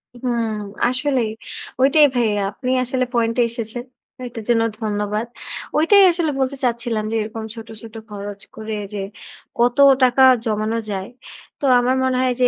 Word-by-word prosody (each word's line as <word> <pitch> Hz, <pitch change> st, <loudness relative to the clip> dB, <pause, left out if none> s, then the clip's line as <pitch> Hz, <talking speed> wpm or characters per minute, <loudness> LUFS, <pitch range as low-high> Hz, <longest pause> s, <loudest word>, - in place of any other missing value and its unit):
হুম! 235 Hz, -2 st, -1 dB, 0.4 s
আসলেই 255 Hz, -2 st, 0 dB, 0.5 s
ঐটাই 290 Hz, +3 st, +6 dB
ভাইয়া 215 Hz, -4 st, +1 dB
আপনি 250 Hz, +5 st, -4 dB
আসলে 255 Hz, +1 st, -1 dB
পয়েন্টে 230 Hz, 0 st, +1 dB
এসেছেন। 230 Hz, +1 st, -4 dB, 0.4 s
এটার 235 Hz, -2 st, -8 dB
জন্য 230 Hz, -1 st, +4 dB, 0.2 s
ধন্যবাদ। 210 Hz, 0 st, -2 dB, 0.5 s
ঐটাই 365 Hz, +7 st, +6 dB
আসলে 335 Hz, -3 st, -1 dB
বলতে 265 Hz, +1 st, 0 dB
চাচ্ছিলাম 235 Hz, -3 st, 0 dB
যে -, -, -1 dB
এরকম 220 Hz, +1 st, -5 dB
ছোট, 225 Hz, -1 st, -9 dB
ছোট 225 Hz, -1 st, -12 dB
খরচ 205 Hz, -1 st, -7 dB
করে 220 Hz, 0 st, -5 dB, 0.2 s
যে 205 Hz, -, -3 dB, 0.6 s
কত 240 Hz, +1 st, +3 dB, 0.3 s
টাকা 255 Hz, +1 st, +5 dB, 0.2 s
জমানো 215 Hz, 0 st, -1 dB
যায়। 195 Hz, +1 st, -4 dB, 0.5 s
তো -, -, -2 dB
আমার 250 Hz, +1 st, +1 dB
মনে 260 Hz, -1 st, +1 dB
হয় 255 Hz, -1 st, +2 dB
যে 250 Hz, -, +6 dB
235 Hz, 150 wpm, -20 LUFS, 220-255 Hz, 0.6 s, ঐটাই